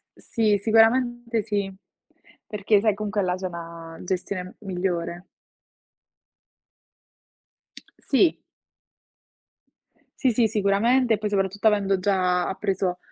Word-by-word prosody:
Sì, 215 -3 +1
sicuramente 230 +2 +2
sì. 200 -3 -2 0.7
Perché 210 0 +1
sai, 215 -2 +3
comunque 210 0 -2
là 180 0 0
c'è 185 0 -4
una 165 -1 -9
gestione 185 0 -3 0.2
m 215 - -17
migliore. 180 -2 -3 2.9
Sì. 315 +5 +4 1.8
Sì, 260 -3 +3
sì, 230 0 +3
sicuramente, 220 +4 +2
e - - -7
poi 210 0 -3
soprattutto 200 +1 -1
avendo 200 -2 +2
già 185 -2 +1
appreso 190 -2 -2
200 Hz, 100 wpm, -24 LUFS, 185-220 Hz, 2.9 s, Sì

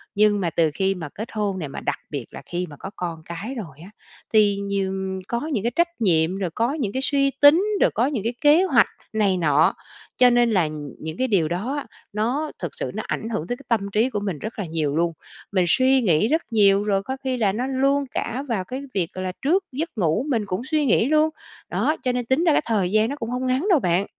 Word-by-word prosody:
nhưng 205 0 +4
mà 175 - 0
từ 160 -1 +1
khi 195 +4 0
mà 160 -5 -6
kết 220 +8 -7
hôn 205 -3 -2
nè, 155 - -4
mà - - -7
đặc 145 - -2
biệt 140 -5 -4
là - - -9
khi 175 +1 -3
mà 145 - -10
có 190 - -6
con 165 -3 -5
cái 195 +10 -6
rồi 160 - -7
á, 190 - -11 0.4
thì 205 -2 +5
nhiều 200 -1 -2 0.3
có 235 - -1
những 205 - -1
cái 235 - 0
trách 340 -5 0
nhiệm, 175 -2 +2
rồi 185 -3 -2
có 235 +5 +1
những 250 -11 -2
cái 260 - -1
suy 275 0 +2
tính, 290 +5 +8 0.2
rồi - - +4
có 235 - +1
những 265 -8 -2
cái 235 +2 -1
kế 300 +4 +6
hoạch 380 - +4 0.3
này 200 -4 +2
nọ. 155 -2 +3 0.4
Cho 250 - +7
nên 240 -1 +3
là 180 -7 +3 0.3
những 160 +2 -6
cái 260 - +1
điều 185 -8 +2
đó, 235 - -2 0.3
nó 250 +9 -1
thực - - -4
sự - - -4
nó - - -3
ảnh 225 - -3
hưởng 215 -8 -3
tới 245 - -3
cái 280 - -15
tâm 230 -2 +3
trí 220 +5 +2
của 210 - -2
mình 195 -7 -3
rất 220 0 -6
là 195 - -2
nhiều 155 -3 -1
luôn. 170 0 +1 0.4
Mình 185 -3 +2
suy 260 +6 +4
nghĩ 185 -1 +3
rất 320 +5 +2
nhiều, 200 -2 +4
rồi 195 -2 0
có 265 +5 -4
khi 260 -1 -1
là 210 -4 +2
nó 245 +6 -2
luôn 275 +1 +1
cả 250 +4 -3
vào 220 -7 -1
cái 260 +8 -6
việc, 180 -4 -1
gọi 185 - -5
là, 185 - -2
trước 350 +8 +2
giấc 315 +6 -3
ngủ 180 +4 +1
mình 225 -6 0
cũng 185 +3 -3
suy 300 +1 +1
nghĩ 230 -2 +3
luôn. 310 +2 +3 0.4
Đó, 310 - +1
cho 250 - +1
nên 245 -1 -2
tính 260 +8 +2
ra 335 - +4
cái - - +3
thời 200 -6 0
gian 215 +2 +3
nó 285 - -3
cũng 230 -5 -5
hông 250 +1 -2
ngắn 260 +10 0
đâu 330 - +5
bạn. 180 -1 +1
215 Hz, 255 wpm, -23 LUFS, 185-260 Hz, 0.4 s, tính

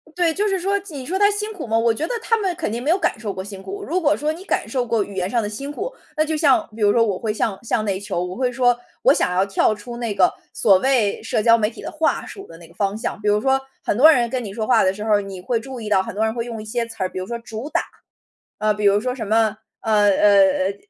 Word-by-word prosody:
对， 345 -2 +2
就 415 +5 0
是 385 -2 0
说 395 +3 0
你 280 -4 -6
说 355 +9 -2
他 405 +1 +5
辛 420 +1 -3
苦 375 -9 -7
吗？ 225 -1 +1
我 230 0 +3
觉 260 +8 -2
得 - - -3
他 455 - +1
们 385 -5 -1
肯 325 -9 -3
定 235 +2 -3
没 290 - +1
有 355 - +3
感 385 - -1
受 210 -3 -4
过 190 - -5
辛 195 -1 -9
苦， 400 - -7
如 365 0 -1
果 305 -3 +2
说 300 +1 -1
你 335 +4 -8
感 - - -1
受 255 -3 -1
过 230 -3 +1
语 200 - -10
言 185 -1 -1
上 235 +4 0
的 205 - -3
辛 275 +7 -6
苦， 405 +11 -4 0.2
那 310 - +2
就 315 0 -2
像 290 -4 +3
比 225 - -9
如 205 0 +5
说 230 - +4
我 200 -5 0
会 215 0 -2
像 210 -2 -1
像 230 -1 0
内 195 -2 -1
求 190 -3 -3
我 180 +1 -5
会 250 -1 0
说， 245 -1 +2 0.2
我 - - +5
想 180 - 0
要 185 +1 +3
跳 200 +2 +2
出 225 +3 -8
那 235 -3 -2
个 185 -2 +4 0.2
所 195 -4 +4
谓 235 -2 +1
社 225 - 0
交 230 +1 +5
媒 215 -1 0
体 235 - -11
的 - - -6
话 315 0 0
术 390 - -10
的 - - -13
那 165 0 -14
个 170 - -20
方 200 +1 -1
向， 225 0 -4
比 210 - -4
如 210 0 +3
说 265 +2 +2 0.2
很 - - -1
多 300 +6 +8
人 240 -6 +2
跟 250 0 -2
你 195 - -7
说 215 0 -3
话 255 - +4
的 185 - +2
时 210 +2 -7
候 215 -1 +1
儿， 205 - +2
你 195 -2 -8
会 230 +5 -1
注 250 +1 -8
意 215 - -5
到 195 -2 +3
很 230 - -7
多 210 +3 -1
人 220 0 0
会 230 -1 -2
用 230 -2 -6
一 - - -10
些 230 +2 -2
词 230 -1 -12
儿， 185 -1 0
比 - - -9
如 185 - -3
说 235 +4 -4
“主 225 +3 -7
打”， - - +2 0.8
呃， 215 0 +2
比 210 0 -2
如 200 +1 +4
说 250 +2 -2
什 230 -4 -5
么， 220 0 +2 0.2
呃 225 - -2
呃 205 -1 +5
呃 195 -1 +4
呃， 200 - -5
225 Hz, 335 characters per minute, -21 LUFS, 205-270 Hz, 0.8 s, 多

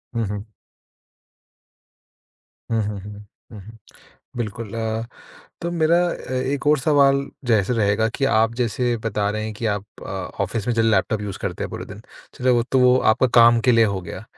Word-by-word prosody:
हुँ, 115 - 0
हुँ। 105 +1 -6 2.2
हुँ, 115 -1 +2
हुँ, 105 -1 -4
हुँ। 105 +1 -10 0.3
हुँ, 110 - -9
हुँ, 110 +3 -13 0.6
बिल्कुल 115 -1 -5
अ, 110 0 -2 0.6
तो 170 - -2
मेरा 165 0 +3
अ, 130 - -7
एक 135 +3 -2
और 150 0 +5
सवाल 140 -1 +3 0.2
जैसे 110 -1 +2
रहेगा 110 0 +2
कि 135 - 0
आप 115 -2 +2
जैसे 120 0 0
बता 105 -1 0
रहे 110 +1 -3
हैं 110 0 -4
कि 115 +2 -5
आप 105 -2 -1 0.2
अ, - - -7 0.3
ऑफिस 105 +3 -4
में 120 - +1
जो 115 - +3
लैपटॉप 110 -1 +1
यूज़ 100 -2 -5
करते - - -3
हैं - - -4
पूरे - - -6
दिन, - - -11 0.3
चलो 125 0 +1
वो 120 - +2
तो 130 - +3
वो 125 0 +5 0.2
आपका 130 +3 +1
काम 115 0 +6
के - - +7
लिए 115 -1 +5
हो 100 -3 -2
गया। - - -8
115 Hz, 190 wpm, -22 LUFS, 105-125 Hz, 2.2 s, के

